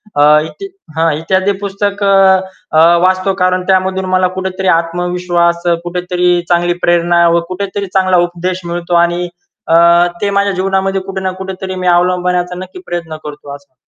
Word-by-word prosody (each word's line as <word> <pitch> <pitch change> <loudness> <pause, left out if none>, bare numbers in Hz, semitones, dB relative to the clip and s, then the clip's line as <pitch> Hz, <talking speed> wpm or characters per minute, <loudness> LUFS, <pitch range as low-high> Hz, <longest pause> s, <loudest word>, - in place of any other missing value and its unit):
अ, 145 - +2 0.2
इ 395 - -8 0.3
हां, 165 0 +2
इत्यादी 190 +4 0
पुस्तक 200 +1 -2
अ, 190 -4 +2 0.2
वाचतो 185 +1 +1
कारण 185 0 +1
त्यामधून 190 0 +1
मला 185 0 +3
कुठेतरी 190 0 -3
आत्मविश्वास, 175 0 -1
अ, - - +3
कुठेतरी 180 0 -1 0.2
चांगली 175 0 +2
प्रेरणा 175 0 +3
व - - +3
कुठेतरी 200 +2 -4
चांगला 185 -1 +2
उपदेश 180 +1 -4
मिळतो 175 0 -4
आणि 175 +1 -3 0.4
अ, 165 - +3 0.5
ते 200 - 0
माझ्या 200 0 +2
जीवनामध्ये 190 +1 -1
कुठे 190 0 -6
ना 185 0 -2
कुठेतरी 190 0 -6
मी 180 - -1
अवलंबण्याचा 180 0 +1
नक्की 185 0 -9
प्रयत्न 170 -2 -5
करतो 145 -1 -8
असं. 140 -2 -18
180 Hz, 150 wpm, -13 LUFS, 175-190 Hz, 0.5 s, मला